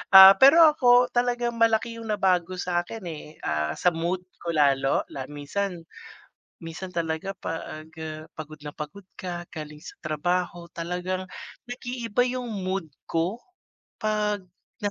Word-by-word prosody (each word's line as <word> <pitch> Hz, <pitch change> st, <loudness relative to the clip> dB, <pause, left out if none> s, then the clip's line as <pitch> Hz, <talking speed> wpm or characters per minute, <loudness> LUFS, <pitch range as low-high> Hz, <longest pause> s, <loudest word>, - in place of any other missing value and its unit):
Ah, 190 Hz, 0 st, +13 dB
pero 280 Hz, +5 st, +9 dB
ako 245 Hz, -4 st, +5 dB
talagang 240 Hz, -1 st, 0 dB
malaki 230 Hz, 0 st, +2 dB
yung 225 Hz, -, -8 dB
nabago 185 Hz, -4 st, +1 dB
sakin, 180 Hz, +4 st, -2 dB
eh, 155 Hz, -2 st, -7 dB, 0.2 s
ah, 75 Hz, 0 st, -1 dB
sa 180 Hz, -, +3 dB
mood 175 Hz, +2 st, -2 dB, 0.2 s
ko 170 Hz, -1 st, -3 dB
lalo, 135 Hz, -2 st, +3 dB
la 135 Hz, -1 st, -5 dB
minsan 165 Hz, +5 st, -4 dB, 0.8 s
minsan 165 Hz, +3 st, -6 dB
talaga 170 Hz, +2 st, -2 dB
'pag, 160 Hz, -2 st, -6 dB
ah, 155 Hz, 0 st, -6 dB
pagod 155 Hz, -1 st, -8 dB
na 150 Hz, -, -6 dB
pagod 150 Hz, +7 st, -8 dB, 0.2 s
ka 175 Hz, -2 st, -4 dB
galing 150 Hz, -1 st, -8 dB
sa -, -, -10 dB
trabaho. 170 Hz, +2 st, -2 dB
Talagang 180 Hz, +2 st, -3 dB, 0.4 s
nag-iiba 245 Hz, -2 st, -1 dB
yung 250 Hz, -1 st, -3 dB, 0.2 s
mood 185 Hz, -2 st, -2 dB, 0.2 s
ko. 180 Hz, +9 st, -1 dB, 0.6 s
'Pag 210 Hz, -1 st, 0 dB, 0.4 s
na 205 Hz, -, +1 dB
180 Hz, 135 wpm, -26 LUFS, 160-215 Hz, 0.8 s, Ah